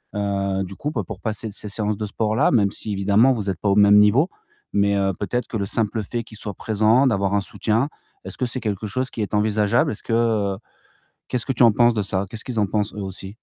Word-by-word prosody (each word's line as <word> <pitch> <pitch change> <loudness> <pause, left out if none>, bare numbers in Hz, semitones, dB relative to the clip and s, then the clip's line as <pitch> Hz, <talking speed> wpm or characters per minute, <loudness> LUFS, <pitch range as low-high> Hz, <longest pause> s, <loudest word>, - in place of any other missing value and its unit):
heu, 100 -1 -1
du 95 +1 -8
coup 150 - -4
pour 110 - -5
passer 110 0 -4
ces 105 +1 -8
séances 105 0 -2
de 105 - -3
sport-là? 110 +5 +1
Même 105 -6 +3
si 105 - -6
évidemment 100 +6 +4
vous 105 -4 -3
êtes 90 - -3
pas 105 - +1
au 100 - +3
même 105 0 +6
niveau, 120 - +4 0.4
mais 100 0 +2
heu, 95 0 +1
peut-être 120 +4 -2
que 110 - -3
le 100 - -1
simple 110 +1 -1
fait 120 +4 -4
qu'ils 110 -1 -13
soient 105 -1 -5
présent, 110 +5 +3
d'avoir 100 -4 +1
un 100 - +2
soutien, 110 +8 -1 0.4
est-ce - - -7
que 130 - 0
c'est 125 +1 -2
quelque 105 -1 -3
chose 130 +5 -2
qui 110 - -5
est 105 - -6
envisageable? 105 +2 +2
Est-ce 110 - -8
que, 115 - -3
heu, 110 -4 +1 0.7
qu'est-ce 125 -2 -2
que 135 - 0
tu 125 - +1
en 115 - +6
penses 120 +2 +4
de 105 - 0
ça? 95 0 -2
Qu'est-ce 110 -1 -5
qu'ils 120 -3 -4
en 105 - +2
pensent 105 +1 -1
eux 105 - -5
aussi 95 0 -8
105 Hz, 245 wpm, -22 LUFS, 100-115 Hz, 0.7 s, même